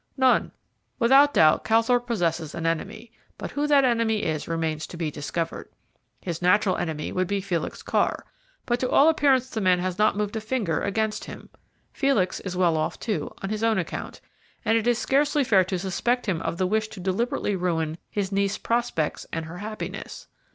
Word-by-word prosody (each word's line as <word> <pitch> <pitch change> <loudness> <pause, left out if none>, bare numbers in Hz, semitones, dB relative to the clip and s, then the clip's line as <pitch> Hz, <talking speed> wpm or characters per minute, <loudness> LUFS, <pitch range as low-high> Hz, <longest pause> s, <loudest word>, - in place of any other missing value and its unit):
"None. 260 -1 +3 0.5
Without 270 +4 +6
doubt 155 -1 +5
Calthorpe 235 +2 +2
possesses 170 -8 -1
an 165 - -4
enemy, 205 +8 -3 0.3
but - - -6
who 290 +1 -1
that 285 -2 +5
enemy 230 -3 +1
is 155 -2 -2
remains 160 -2 -2
to 175 - -9
be 160 -3 -2
discovered. 160 +3 -4 0.5
His 170 -2 -5
natural 185 +2 +3
enemy 155 -3 -3
would 185 -1 0
be 200 +1 0
Felix 175 -4 -3
Carr, - - 0 0.4
but 240 -1 0
to 255 - -1
all 295 +3 +6
appearance 270 -5 +3
the 220 - -3
man 185 -2 +4
has 185 +1 -3
not 210 -1 +3
moved 210 0 -2
a 220 - -2
finger 215 -8 -1
against 215 +1 -1
him. - - -10 0.4
Felix 270 -10 +1
is 185 -2 -5
well 170 -3 +3
off, 155 - -2
too, 220 -2 -3
on 195 - -3
his 215 +1 -2
own 225 -1 +3
account, 175 -4 -5 0.4
and 225 - +3
it 230 0 +1
is 240 -1 +3
scarcely 290 +3 +2
fair 200 -7 +4
to 185 0 -2
suspect 220 +7 -1
him 180 -6 -1
of - - -3
the 185 - +1
wish 215 +3 0
to 215 - -11
deliberately 205 +4 -1
ruin 165 -3 -1
his 200 -2 -2
niece's 200 0 0
prospects 230 -10 -1
and 165 -1 -3
her 165 +3 -8
happiness. 215 +1 -6
200 Hz, 190 wpm, -25 LUFS, 175-235 Hz, 0.5 s, Without